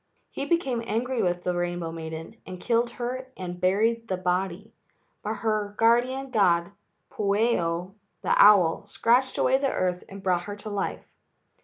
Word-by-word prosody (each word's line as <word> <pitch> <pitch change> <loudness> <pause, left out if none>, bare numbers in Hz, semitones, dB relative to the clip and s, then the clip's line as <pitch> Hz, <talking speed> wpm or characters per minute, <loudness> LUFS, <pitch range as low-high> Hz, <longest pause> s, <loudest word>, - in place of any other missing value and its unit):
He 275 - -4
became 275 -9 0
angry 240 +3 -1
with 175 -2 0
the 180 - 0
rainbow 175 -1 -2
maiden 160 +5 -7
and 185 -1 -9
killed 235 +2 +1
her 255 +2 -4
and 180 -1 -6
buried 225 +5 +1
the 185 - -1
body, 185 +3 -2 0.5
but 215 +1 -3
her 210 -2 0
guardian 250 +4 +2
god, 180 -5 +2 0.4
Pueo, 200 -4 0 0.3
the - - +2
owl, 200 -2 +5
scratched 245 +5 +2
away 265 +1 +3
the 275 -1 +1
earth 180 -1 -1
and 195 0 -10
brought 180 -2 +1
her 205 - -5
to 210 +1 -8
life. 200 -1 -3
205 Hz, 155 wpm, -26 LUFS, 180-235 Hz, 0.5 s, owl